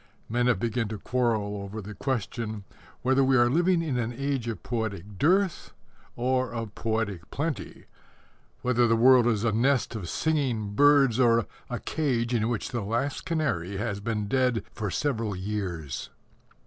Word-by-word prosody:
Men 120 Hz, +2 st, +1 dB
have 125 Hz, -5 st, +3 dB
begun 115 Hz, 0 st, -1 dB
to 110 Hz, 0 st, -5 dB
quarrel 110 Hz, -3 st, 0 dB
over 100 Hz, +2 st, -6 dB
the 105 Hz, +1 st, -7 dB
question 110 Hz, -3 st, -3 dB, 0.4 s
whether 130 Hz, +1 st, +3 dB
we 130 Hz, 0 st, +4 dB
are 120 Hz, 0 st, +4 dB
living 175 Hz, +3 st, +3 dB
in 135 Hz, -6 st, -1 dB
an 120 Hz, 0 st, -1 dB
age 135 Hz, -1 st, -2 dB
of 110 Hz, -7 st, -4 dB
poetic 105 Hz, -5 st, -4 dB
dearth 185 Hz, +3 st, +2 dB, 0.4 s
or 130 Hz, +1 st, 0 dB
of 115 Hz, -3 st, -5 dB
poetic 110 Hz, -6 st, -2 dB
plenty 150 Hz, +1 st, -4 dB, 0.8 s
whether 125 Hz, -1 st, +3 dB
the 115 Hz, -, +3 dB
world 125 Hz, +1 st, +6 dB
is 110 Hz, -3 st, +1 dB
a 115 Hz, -, +2 dB
nest 125 Hz, +4 st, +2 dB
of 100 Hz, -7 st, -5 dB
singing 130 Hz, -10 st, 0 dB
birds 140 Hz, -1 st, +5 dB
or 115 Hz, -3 st, +4 dB, 0.2 s
a -, -, -3 dB
cage 125 Hz, -6 st, -1 dB
in 115 Hz, -1 st, +1 dB
which 120 Hz, -3 st, -2 dB
the 120 Hz, -, -2 dB
last 120 Hz, +7 st, -2 dB
canary 100 Hz, -, -1 dB
has 105 Hz, -1 st, -2 dB
been 105 Hz, -1 st, -2 dB
dead 125 Hz, -1 st, +1 dB
for 105 Hz, -2 st, -3 dB
several 115 Hz, -3 st, -1 dB
years. 90 Hz, -7 st, -4 dB
115 Hz, 160 wpm, -27 LUFS, 105-130 Hz, 0.8 s, world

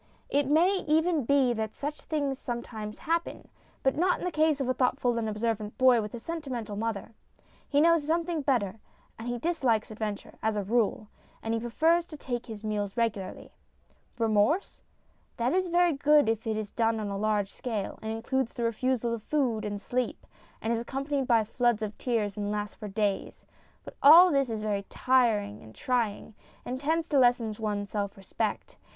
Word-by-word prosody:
It 285 Hz, -1 st, +1 dB
may 345 Hz, +7 st, +4 dB
even 320 Hz, -2 st, +2 dB
be 270 Hz, -2 st, +3 dB
that 220 Hz, -1 st, -3 dB
such 295 Hz, +1 st, -5 dB
things 285 Hz, -4 st, -2 dB
some 240 Hz, -1 st, -4 dB
times 215 Hz, -2 st, -7 dB
happen. 335 Hz, +1 st, -2 dB, 0.3 s
But 265 Hz, -, +2 dB
not 360 Hz, +3 st, +2 dB
in -, -, -5 dB
the 360 Hz, -, -1 dB
case 310 Hz, -2 st, +2 dB
of 270 Hz, -, -1 dB
a 255 Hz, -, +2 dB
thoughtful 250 Hz, -1 st, +1 dB
and 220 Hz, -1 st, -2 dB
observant 215 Hz, -1 st, -2 dB
boy 255 Hz, -3 st, +5 dB
with 210 Hz, +2 st, -6 dB
a -, -, -6 dB
sentimental 255 Hz, -8 st, -5 dB
mother. 225 Hz, 0 st, -3 dB, 0.6 s
He 285 Hz, -, +3 dB
knows 335 Hz, -1 st, +4 dB
something 335 Hz, 0 st, 0 dB
better, 230 Hz, -7 st, 0 dB, 0.4 s
and 225 Hz, -, -6 dB
he 245 Hz, 0 st, -2 dB
dislikes 245 Hz, -8 st, 0 dB
adventure, 210 Hz, -1 st, -5 dB
as 220 Hz, 0 st, 0 dB
a 205 Hz, -, -1 dB
rule, 215 Hz, 0 st, 0 dB, 0.4 s
and 225 Hz, -, -1 dB
he 230 Hz, -, 0 dB
prefers 320 Hz, +9 st, +2 dB
to 305 Hz, -, -9 dB
take 245 Hz, -4 st, -4 dB
his 220 Hz, -2 st, -8 dB
meals 210 Hz, -1 st, -2 dB
regularly. 215 Hz, -5 st, -2 dB, 0.7 s
Remorse? 225 Hz, -, +1 dB, 0.6 s
That 240 Hz, +2 st, +1 dB
is 370 Hz, 0 st, +1 dB
very 350 Hz, -1 st, +3 dB
good 290 Hz, -1 st, +4 dB
if 225 Hz, +1 st, -1 dB
it 220 Hz, -1 st, 0 dB
is 215 Hz, -2 st, -4 dB
done 225 Hz, -1 st, +1 dB
on 210 Hz, -1 st, -3 dB
a 200 Hz, -, -3 dB
large 205 Hz, -1 st, 0 dB
scale, 220 Hz, -6 st, -4 dB
and 220 Hz, -, -4 dB
includes 235 Hz, +3 st, -2 dB
the 240 Hz, -, -3 dB
refusal 235 Hz, +1 st, 0 dB
of 230 Hz, -, -4 dB
food 245 Hz, -4 st, 0 dB
and 205 Hz, -1 st, -3 dB
sleep, 245 Hz, +4 st, -3 dB, 0.4 s
and 225 Hz, -, +1 dB
is 230 Hz, -, 0 dB
accompanied 270 Hz, +2 st, -2 dB
by 230 Hz, -3 st, +4 dB
floods 235 Hz, 0 st, +1 dB
of 210 Hz, 0 st, -4 dB
tears, 220 Hz, -5 st, -1 dB
and 205 Hz, 0 st, -2 dB
lasts 210 Hz, 0 st, -3 dB
for 210 Hz, -, -8 dB
days. 205 Hz, -1 st, -2 dB, 0.4 s
But -, -, -10 dB
all 345 Hz, +5 st, +9 dB
this 275 Hz, -3 st, +2 dB
is 220 Hz, -2 st, -3 dB
very 205 Hz, -2 st, -1 dB
trying, 210 Hz, -, +1 dB, 0.9 s
and 255 Hz, +1 st, -4 dB
tends 320 Hz, +3 st, 0 dB
to 285 Hz, -, +3 dB
lessen 240 Hz, -3 st, +3 dB
one's 205 Hz, -2 st, -2 dB
self 200 Hz, -2 st, -3 dB
respect. 195 Hz, -, -4 dB
235 Hz, 185 wpm, -28 LUFS, 215-285 Hz, 0.9 s, all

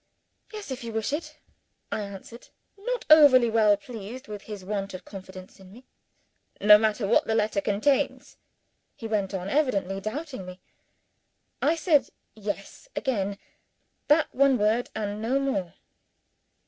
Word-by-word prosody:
"Yes 425 Hz, -8 st, -8 dB
if 260 Hz, -1 st, -5 dB
you 230 Hz, -1 st, -6 dB
wish 220 Hz, +4 st, -2 dB
it," 310 Hz, +3 st, -4 dB, 0.5 s
I -, -, -2 dB
answered: 200 Hz, +4 st, -9 dB, 0.3 s
not 480 Hz, +4 st, -4 dB
over 295 Hz, -4 st, +9 dB
well 215 Hz, -2 st, +4 dB
pleased 230 Hz, +3 st, -9 dB
with 210 Hz, -1 st, -7 dB
his 205 Hz, -3 st, -9 dB
want 195 Hz, -1 st, -3 dB
of 185 Hz, -, -10 dB
confidence 190 Hz, -1 st, -11 dB
in 190 Hz, -1 st, -15 dB
me. 245 Hz, +5 st, -15 dB, 0.7 s
"No 210 Hz, 0 st, +8 dB
matter 215 Hz, 0 st, 0 dB
what 225 Hz, -, +3 dB
the 220 Hz, -, +1 dB
letter 215 Hz, -2 st, +1 dB
contains?" 215 Hz, +8 st, 0 dB, 0.6 s
he 225 Hz, -, -7 dB
went 205 Hz, -3 st, -1 dB
on, 190 Hz, -2 st, -4 dB
evidently 200 Hz, -8 st, 0 dB
doubting 260 Hz, -, -5 dB
me. 185 Hz, 0 st, -10 dB, 1.0 s
I 310 Hz, +4 st, +3 dB
said 315 Hz, -4 st, +2 dB, 0.2 s
Yes, 205 Hz, -, -6 dB
again 205 Hz, -7 st, -1 dB, 0.7 s
that 305 Hz, +1 st, +3 dB
one 270 Hz, 0 st, +4 dB
word, 220 Hz, +3 st, +1 dB
and 210 Hz, -1 st, -3 dB
no 250 Hz, +5 st, +1 dB
more. 195 Hz, -11 st, -2 dB
215 Hz, 145 wpm, -26 LUFS, 200-265 Hz, 1.0 s, over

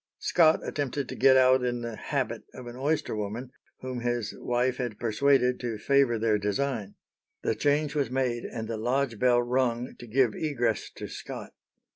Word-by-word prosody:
Scott 160 Hz, -2 st, +4 dB
attempted 140 Hz, -2 st, -2 dB
to -, -, -5 dB
get 130 Hz, 0 st, +6 dB
out 130 Hz, 0 st, +5 dB
in 120 Hz, -1 st, -1 dB
the 115 Hz, -1 st, -5 dB
"habit" -, -, -2 dB
of 130 Hz, -, -9 dB
an 120 Hz, 0 st, -8 dB
oyster 145 Hz, 0 st, -1 dB
woman, 110 Hz, +5 st, -4 dB, 0.3 s
whom 130 Hz, -1 st, -4 dB
his 120 Hz, -3 st, -2 dB
wife 125 Hz, +1 st, 0 dB
had 120 Hz, -5 st, -3 dB
persuaded 125 Hz, +3 st, +2 dB
to 120 Hz, -3 st, -3 dB
favour 135 Hz, 0 st, +3 dB
their 110 Hz, -1 st, +2 dB
design. 105 Hz, 0 st, -2 dB, 0.5 s
The -, -, +1 dB
change 145 Hz, +4 st, +1 dB
was 140 Hz, -5 st, 0 dB
made, 125 Hz, -2 st, -1 dB
and 110 Hz, -1 st, -5 dB
the 115 Hz, -1 st, -3 dB
lodge 120 Hz, 0 st, 0 dB
bell 120 Hz, -1 st, +4 dB
rung 125 Hz, 0 st, 0 dB
to 120 Hz, -, -9 dB
give 120 Hz, -1 st, +2 dB
egress 120 Hz, -8 st, -1 dB
to -, -, -6 dB
Scott. -, -, -8 dB
125 Hz, 175 wpm, -28 LUFS, 115-135 Hz, 0.5 s, get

